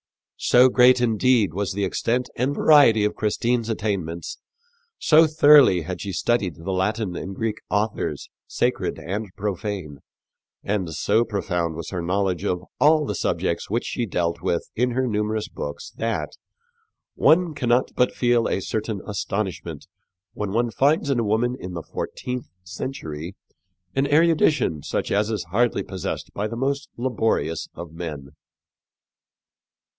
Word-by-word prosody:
So 125 +1 +6
great, 125 0 +5
indeed, 115 -4 +2
was 100 +1 -2
the 100 +1 -2
extent 120 +6 -1
and 135 +3 0
variety 130 -9 +6
of 105 - 0
Christine's 115 +2 0
attainments, 95 -7 -3 0.6
so 160 +1 +5
thoroughly 150 - +6
had 90 +3 -5
she 100 - -4
studied 95 -2 0
the 85 +5 -5
Latin 95 0 -1
and 95 +2 -6
Greek 110 0 -2
authors, 105 +1 -1 0.2
sacred - - -1
and 95 +7 -4
profane, 95 -7 -4 0.6
and 95 -5 -2
so 115 - +2
profound 90 -7 -2
was 80 -1 -6
her 90 -2 -3
knowledge 95 +1 -1
of 90 -3 -1 0.2
all 150 0 +5
the 105 - -2
subjects 85 -2 -1
which 115 +4 -1
she 120 - -2
dealt 85 -3 -1
with 85 - -1
in 125 +2 +1
her 130 +2 0
numerous 105 -1 -1
books 75 -10 -7
that 115 0 -2 0.8
"one 170 0 +3
cannot 125 -2 +1
but 125 - +3
feel 120 -2 +2
a - - 0
certain 110 -1 -3
astonishment 100 -2 -4 0.5
when 105 -2 -3
one 120 +2 0
finds 140 +6 +2
in 130 - +1
a - - +1
woman 115 +4 +1
in 90 -1 -7
the 85 - -5
fourteenth 125 +9 -5 0.2
century 90 - -6 0.6
an 135 +1 +2
erudition 155 - +3
such - - -3
as 105 +2 +1
is 110 -4 -2
hardly 120 +4 +1
possessed 95 -3 -5
by 105 +2 -2
the 115 +2 -6
most 140 +3 -1
laborious 115 -9 -1
of 85 -2 -8
men." 75 -5 -6
105 Hz, 145 wpm, -23 LUFS, 95-125 Hz, 0.8 s, So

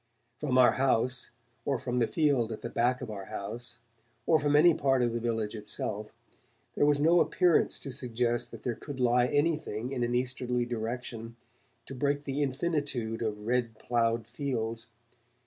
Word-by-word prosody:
From 135 -4 0
our 125 -1 +7
house, 125 -1 +1 0.3
or 135 +1 0
from 125 +1 -2
the 115 - +3
field 140 -8 +2
at 110 - -6
the 120 - -4
back 125 +1 +1
of 110 - -5
our 100 -2 -6
house, 120 +5 -6 0.5
or 160 -2 +4
from 145 -1 +2
any 165 +3 +7
part 135 -4 +2
of 120 -1 +1
the 120 - -1
village 115 -2 -1
itself, 105 0 -4 0.6
there 145 - +3
was 145 -1 +3
no 165 +4 +5
appearance 180 0 +3
to 140 - -6
suggest 120 -1 -1
that - - -11
there 125 - -1
could 140 +3 -8
lie 125 0 +4
anything 145 -6 0
in 130 -3 -2
an 120 0 0
easterly 125 -1 -1
direction 115 0 -5 0.5
to - - -8
break 145 +2 0
the 140 0 -2
infinitude 140 -5 -1
of 105 -2 -3
red 120 -2 0
ploughed 115 -1 0
fields. 115 -6 -3
125 Hz, 170 wpm, -30 LUFS, 115-140 Hz, 0.6 s, our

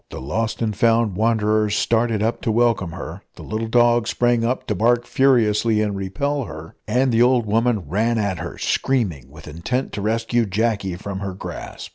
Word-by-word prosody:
The - - -7
lost 110 - -2
and 110 -2 -1
found 115 -2 +2
wanderers 110 -1 +1
started 115 -1 +1
up 115 +2 -1
to 115 - 0
welcome 110 -7 +1
her, - - -7
the - - -11
little 110 +1 -3
dog 120 0 +3
sprang 120 -1 +1
up 125 +3 -1
to - - -1
bark 120 +4 +2
furiously 115 -4 +2
and 105 -2 0
repel 125 +9 -2
her, 80 -3 -9
and 130 +1 +2
the 115 0 +3
old 125 -1 +4
woman 110 -3 0
ran 110 +8 0
at 100 -5 -1
her, - - -6
screaming, 90 - -1
with 75 +3 -13
intent 85 - -3
to 100 - -5
rescue 115 +2 0
Jacky 100 -2 -1
from 95 +1 -6
her 100 -2 -5
grasp. - - -8
110 Hz, 185 wpm, -21 LUFS, 100-120 Hz, -, old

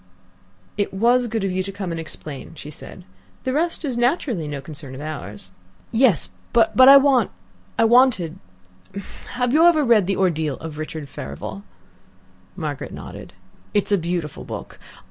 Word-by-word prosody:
"It 200 -1 -1
was 240 +4 +3
good 225 -2 -2
of 195 - 0
you 185 +1 0
to 195 +1 -5
come 195 -3 -5
and 165 - -3
explain," 155 -1 -6
she 150 0 -9
said. 180 +3 -8 0.4
"The 260 - -1
rest 330 +2 0
is 255 -4 -2
naturally 240 - 0
no 145 -1 -4
concern 140 -2 -9
of 135 - -8
ours." 105 -11 -7 0.4
"Yes, 225 - +3 0.2
but 225 -2 +4
I 270 +2 +11
want 270 -6 +4 0.5
I 230 - +4
wanted 225 -8 +4 0.9
have 245 0 0
you 315 +2 +5
ever 315 -3 +4
read 225 -7 +4
THE 195 - +1
ORDEAL 160 -7 +1
OF 155 -2 -8
RICHARD 155 -1 -5
FEVEREL?" 100 - -7 0.9
Margaret 145 -3 -4
nodded. - - -9 0.4
"It's 205 0 +1
a 200 - +5
beautiful 170 -3 -3
book. - - -8
185 Hz, 160 wpm, -22 LUFS, 150-240 Hz, 0.9 s, I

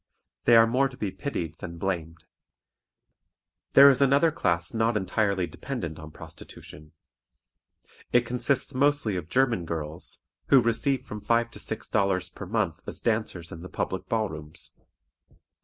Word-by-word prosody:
They 120 - +6
are 115 0 +8
more 130 +4 +2
to 125 - -14
be 100 -3 -3
pitied 85 - -5
than 85 -1 -7
blamed. 85 -3 -4 1.5
There 140 +1 +9
is 140 -1 +5
another 140 +4 +4
class 85 - -1
not 115 0 +1
entirely 100 -1 0
dependent 85 - -6
on 80 0 -9
prostitution. 75 0 -12 1.2
It 120 0 +4
consists 125 +3 -1
mostly 140 -5 +2
of 85 -3 -5
German 120 -6 +2
girls, 80 0 -5 0.3
who 135 - +7
receive 125 +3 0
from 105 -4 -7
five 115 +2 +1
to - - -10
six 110 - -5
dollars 95 -3 0
per 100 - -9
month 100 -6 -1
as - - -6
dancers 110 -7 -1
in 80 - -8
the 90 - -9
public 95 0 -3
ball 110 -1 +1
rooms. 75 -2 -9
105 Hz, 150 wpm, -27 LUFS, 85-125 Hz, 1.5 s, There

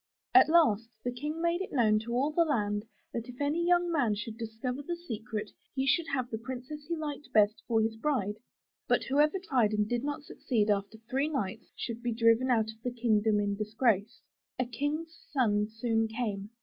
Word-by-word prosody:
At 380 -4 +8
last 230 -10 +4
the 245 - -1
King 300 +6 -4
made 340 +2 +1
it 385 - -4
known 215 -5 +3
to 230 +2 -6
all 275 +5 +2
the 335 +2 +4
land 210 -8 0 0.3
that 230 +1 -4
if 245 - -10
any 295 +4 +1
young 350 0 +3
man 255 -10 +2
could 220 +2 -5
discover 230 +4 -4
the 345 +4 -3
secret 220 -10 -5 0.2
he 265 0 0
should 315 +4 +2
have 255 -3 -2
the 220 - -3
princess 260 +5 -7
he 340 - -1
liked 295 -2 -5
best 210 0 +4
for 225 -2 +3
his 220 0 -1
bride; 220 -6 -1 0.5
but - - +3
whoever 295 +6 +3
tried 255 - +1
and 210 0 +1
did 240 +2 -1
not 290 0 -3
succeed 220 -7 0
after 200 +2 -1
three 270 +5 0
nights, 225 -7 -3
should 235 -1 -5
be 240 -1 -1
driven 230 +2 +4
out 220 -3 +2
of 220 0 -20
the 250 - 0
kingdom 220 -3 +2
in 205 -1 0
disgrace. 215 0 0 0.4
A 255 - +1
King's 295 +7 -3
son 210 -7 +2
soon 225 0 0
came. 215 -3 -3
240 Hz, 200 wpm, -30 LUFS, 220-290 Hz, 0.5 s, At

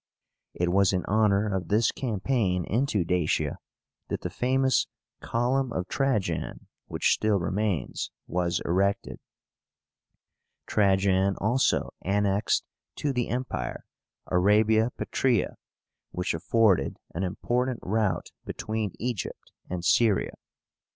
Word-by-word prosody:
It 90 0 0
was 100 +1 +4
in 90 - 0
honor 105 -1 +2
of 90 -3 -3
this 110 +4 +3
campaign 105 -6 0
into 115 -4 +1
Dacia 90 -2 0 0.5
that - - -3
the - - -4
famous 130 0 +2 0.3
COLUMN 125 +2 0
OF 90 -4 -3
TRAJAN, 105 - -1 0.2
which - - +2
still 110 -2 +2
remains, 95 0 -1 0.2
was 85 0 -1
erected. 100 +3 0 1.5
Trajan 95 -1 +2
also 120 +6 +1
annexed 100 +1 +1 0.3
to 145 -2 -1
the 125 -2 -1
Empire 120 - -3 0.4
Arabia 110 +5 +3
Petraea, 120 -8 +1 0.6
which 90 +1 -2
afforded 95 -2 +2 0.2
an 85 - -3
important 120 +6 -1
route 105 -2 0
between 110 -3 -3
Egypt 120 -4 -4 0.2
and 90 -1 -4
Syria. 110 0 +3
105 Hz, 105 wpm, -27 LUFS, 90-115 Hz, 1.5 s, was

